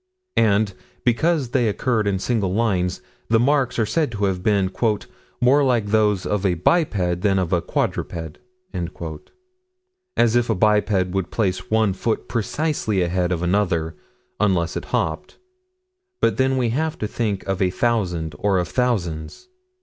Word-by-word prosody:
And, 105 Hz, -2 st, +3 dB, 0.3 s
because 140 Hz, +3 st, +2 dB
they 125 Hz, -2 st, +2 dB
occurred 110 Hz, 0 st, 0 dB
in 100 Hz, -1 st, +1 dB
single 100 Hz, -2 st, 0 dB
lines, 95 Hz, -4 st, 0 dB, 0.3 s
the 115 Hz, 0 st, +4 dB
marks 130 Hz, 0 st, +2 dB
are 110 Hz, -, +2 dB
said 150 Hz, +4 st, 0 dB
to 105 Hz, -1 st, 0 dB
have 95 Hz, -2 st, -1 dB
been 100 Hz, -2 st, +1 dB, 0.7 s
"more 135 Hz, +4 st, +4 dB
like 120 Hz, -5 st, +2 dB
those 105 Hz, -2 st, +2 dB
of 105 Hz, -1 st, -1 dB
a 95 Hz, -3 st, +2 dB
biped 90 Hz, -, +1 dB
than 100 Hz, -1 st, +2 dB
of 90 Hz, -1 st, 0 dB
a 85 Hz, -, +2 dB
quadruped" 80 Hz, -2 st, -3 dB, 1.8 s
as 120 Hz, -1 st, +3 dB
if 120 Hz, -1 st, +2 dB
a 110 Hz, -, +2 dB
biped 105 Hz, -1 st, +2 dB
would 95 Hz, -1 st, -2 dB
place 95 Hz, -5 st, -1 dB
one 110 Hz, -3 st, +2 dB
foot 110 Hz, +4 st, -2 dB
precisely 115 Hz, -, -1 dB
ahead 90 Hz, +1 st, 0 dB
of 90 Hz, -1 st, -1 dB
another 85 Hz, -4 st, 0 dB, 0.4 s
unless 90 Hz, -6 st, +1 dB
it -, -, -4 dB
hopped 80 Hz, -1 st, -2 dB, 0.8 s
but -, -, +2 dB
then 130 Hz, 0 st, +2 dB
we 125 Hz, -2 st, +1 dB
have 155 Hz, +6 st, -1 dB
to -, -, -3 dB
think 105 Hz, -3 st, -2 dB
of 95 Hz, -1 st, -1 dB
a 95 Hz, -, +3 dB
thousand, 90 Hz, -7 st, -1 dB
or 100 Hz, -2 st, +2 dB
of 90 Hz, -2 st, -1 dB
thousands. 95 Hz, -, -2 dB
105 Hz, 155 wpm, -22 LUFS, 90-120 Hz, 1.8 s, the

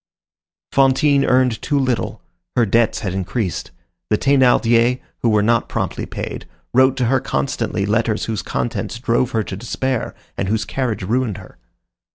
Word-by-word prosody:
Fantine 140 Hz, +1 st, +4 dB
earned 125 Hz, -3 st, +2 dB
too 145 Hz, -, 0 dB
little. 130 Hz, -3 st, -1 dB, 0.3 s
Her 120 Hz, -2 st, +4 dB
debts 115 Hz, +2 st, +2 dB
had 100 Hz, -4 st, -2 dB
increased. 95 Hz, 0 st, -2 dB, 0.4 s
The 105 Hz, -, +3 dB
Thénardiers, 125 Hz, -2 st, +3 dB, 0.2 s
who 120 Hz, -, +1 dB
were 105 Hz, -1 st, +3 dB
not 115 Hz, +1 st, +2 dB
promptly -, -, -3 dB
paid, -, -, -6 dB, 0.3 s
wrote 130 Hz, +1 st, +4 dB
to 125 Hz, -, +1 dB
her 130 Hz, +3 st, +3 dB
constantly 115 Hz, -5 st, -2 dB
letters 110 Hz, +1 st, 0 dB
whose 110 Hz, -2 st, -2 dB
contents 120 Hz, 0 st, -3 dB
drove 120 Hz, 0 st, +1 dB
her 115 Hz, -4 st, 0 dB
to 95 Hz, -, -6 dB
despair, 120 Hz, +4 st, -2 dB, 0.2 s
and 95 Hz, -, -2 dB
whose 110 Hz, +2 st, 0 dB
carriage 120 Hz, -7 st, -2 dB
ruined 115 Hz, +1 st, 0 dB
her. -, -, -13 dB
120 Hz, 155 wpm, -20 LUFS, 110-130 Hz, 0.4 s, Fantine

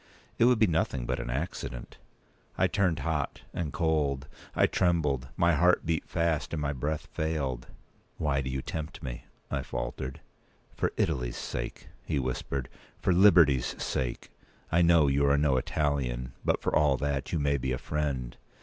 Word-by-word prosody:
It 115 Hz, -, +6 dB
would 125 Hz, -1 st, +5 dB
be 110 Hz, -, +5 dB
nothing 80 Hz, -, 0 dB
but 65 Hz, +1 st, -1 dB
an -, -, -4 dB
accident." 65 Hz, -3 st, -4 dB, 0.6 s
I -, -, +4 dB
turned 90 Hz, -5 st, +1 dB
hot 75 Hz, -5 st, -2 dB
and 80 Hz, -4 st, -2 dB
cold; 75 Hz, -6 st, 0 dB, 0.3 s
I -, -, +5 dB
trembled; 75 Hz, -8 st, +1 dB
my 85 Hz, -1 st, +4 dB
heart 90 Hz, +4 st, +3 dB
beat 80 Hz, -1 st, -1 dB
fast, 85 Hz, -2 st, 0 dB
and 80 Hz, -, -1 dB
my 70 Hz, -1 st, -1 dB
breath 75 Hz, +3 st, -2 dB
failed. 70 Hz, -6 st, -2 dB, 0.5 s
"Why 70 Hz, -3 st, +1 dB
do 65 Hz, -, -4 dB
you 65 Hz, 0 st, -3 dB
tempt 80 Hz, +1 st, -5 dB
me?" 60 Hz, -3 st, -6 dB, 0.3 s
I -, -, 0 dB
faltered. 65 Hz, 0 st, -4 dB, 0.6 s
"For -, -, 0 dB
Italy's -, -, 0 dB
sake," -, -, -5 dB
he -, -, -1 dB
whispered; 65 Hz, 0 st, -2 dB, 0.3 s
"for 95 Hz, -, +2 dB
liberty's 85 Hz, -9 st, +5 dB
sake. 65 Hz, -2 st, -3 dB, 0.4 s
I 85 Hz, -, +4 dB
know 85 Hz, -2 st, +6 dB
you 70 Hz, 0 st, +2 dB
are 70 Hz, +1 st, +4 dB
no 70 Hz, -2 st, +3 dB
Italian; 65 Hz, -3 st, -1 dB
but, -, -, +1 dB
for -, -, +1 dB
all 75 Hz, -3 st, +4 dB
that, 70 Hz, 0 st, -2 dB
you 85 Hz, -, +1 dB
may 70 Hz, -1 st, +2 dB
be 65 Hz, 0 st, -2 dB
a 65 Hz, -, 0 dB
friend. 70 Hz, -5 st, -2 dB
70 Hz, 170 wpm, -29 LUFS, 65-80 Hz, 0.6 s, It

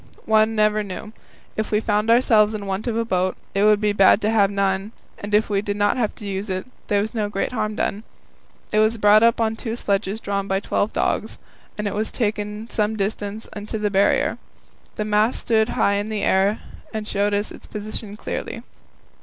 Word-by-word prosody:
One 220 Hz, 0 st, +3 dB
never 215 Hz, 0 st, +3 dB
knew; 205 Hz, +2 st, -7 dB, 0.4 s
if 215 Hz, -, -2 dB
we 210 Hz, -, +2 dB
found 210 Hz, 0 st, 0 dB
ourselves 220 Hz, -3 st, +4 dB
in 205 Hz, -1 st, -5 dB
want 195 Hz, +4 st, -3 dB
of 230 Hz, -1 st, -1 dB
a 230 Hz, -, 0 dB
boat, 185 Hz, -3 st, 0 dB, 0.2 s
it 200 Hz, +1 st, +2 dB
would 210 Hz, -1 st, +5 dB
be 210 Hz, -1 st, +1 dB
bad 195 Hz, 0 st, +6 dB
to 215 Hz, -, +1 dB
have 205 Hz, -3 st, +4 dB
none, 195 Hz, +1 st, -1 dB, 0.3 s
and 205 Hz, 0 st, -1 dB
if 215 Hz, -, +3 dB
we 200 Hz, -1 st, 0 dB
did 205 Hz, 0 st, -3 dB
not 205 Hz, 0 st, +2 dB
have 230 Hz, -4 st, -1 dB
to 210 Hz, -, -10 dB
use 195 Hz, +1 st, -4 dB
it, 185 Hz, 0 st, -2 dB, 0.2 s
there 205 Hz, -1 st, +2 dB
was 215 Hz, +3 st, -4 dB
no 215 Hz, -3 st, -1 dB
great 195 Hz, +3 st, -2 dB
harm 215 Hz, -3 st, -2 dB
done. 205 Hz, -, -1 dB, 0.7 s
It 215 Hz, -, +2 dB
was 215 Hz, +1 st, +3 dB
brought 210 Hz, 0 st, +6 dB
up 230 Hz, +1 st, +4 dB
on 225 Hz, -1 st, +1 dB
two 225 Hz, 0 st, -4 dB
sledges 200 Hz, -2 st, -1 dB
drawn 200 Hz, -2 st, -2 dB
by 195 Hz, 0 st, +1 dB
twelve 205 Hz, +1 st, -1 dB
dogs, -, -, -1 dB, 0.4 s
and 210 Hz, 0 st, -2 dB
was 215 Hz, +2 st, -1 dB
taken 210 Hz, -1 st, -3 dB
some 215 Hz, -1 st, -1 dB
distance 205 Hz, +1 st, -3 dB
into 210 Hz, +1 st, -4 dB
the 210 Hz, -1 st, -1 dB
Barrier. 195 Hz, 0 st, +2 dB, 0.6 s
The 210 Hz, -, -2 dB
mast 215 Hz, +3 st, +2 dB
stood 220 Hz, -1 st, +2 dB
high 200 Hz, -, +2 dB
in 205 Hz, +2 st, -3 dB
the 215 Hz, -2 st, -2 dB
air, 195 Hz, +3 st, +3 dB, 0.3 s
and 215 Hz, -1 st, -4 dB
showed 205 Hz, 0 st, +1 dB
us 205 Hz, +1 st, -1 dB
its -, -, -11 dB
position 210 Hz, 0 st, -6 dB
clearly. 230 Hz, -, -5 dB
210 Hz, 205 wpm, -22 LUFS, 200-220 Hz, 0.7 s, bad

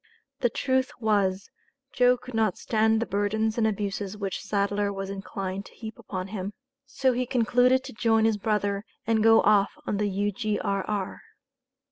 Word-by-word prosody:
The 240 Hz, -, +2 dB
truth 260 Hz, +2 st, 0 dB
was, 200 Hz, -4 st, +1 dB, 0.4 s
Joe 250 Hz, 0 st, +4 dB
could 250 Hz, +1 st, -11 dB
not 220 Hz, -4 st, +1 dB
stand 220 Hz, 0 st, +2 dB
the -, -, -4 dB
burdens 215 Hz, +3 st, 0 dB
and 220 Hz, -, +3 dB
abuses 205 Hz, -1 st, -3 dB
which 195 Hz, -3 st, -3 dB
Sadler 200 Hz, 0 st, 0 dB
was 195 Hz, 0 st, -5 dB
inclined 195 Hz, 0 st, -5 dB
to -, -, -18 dB
heap 220 Hz, -1 st, -8 dB
upon 185 Hz, -1 st, -5 dB
him. 200 Hz, 0 st, -4 dB, 0.3 s
So 260 Hz, 0 st, +1 dB
he 250 Hz, +1 st, -1 dB
concluded 250 Hz, +1 st, +3 dB
to -, -, -9 dB
join 225 Hz, 0 st, +2 dB
his 220 Hz, -2 st, +2 dB
brother 205 Hz, -1 st, 0 dB, 0.2 s
and 225 Hz, -1 st, +2 dB
go 225 Hz, +1 st, +6 dB
off 205 Hz, -1 st, +3 dB
on 205 Hz, -, -1 dB
the 205 Hz, 0 st, 0 dB
U.G.R.R. 205 Hz, -1 st, -2 dB
210 Hz, 160 wpm, -26 LUFS, 200-225 Hz, 0.4 s, go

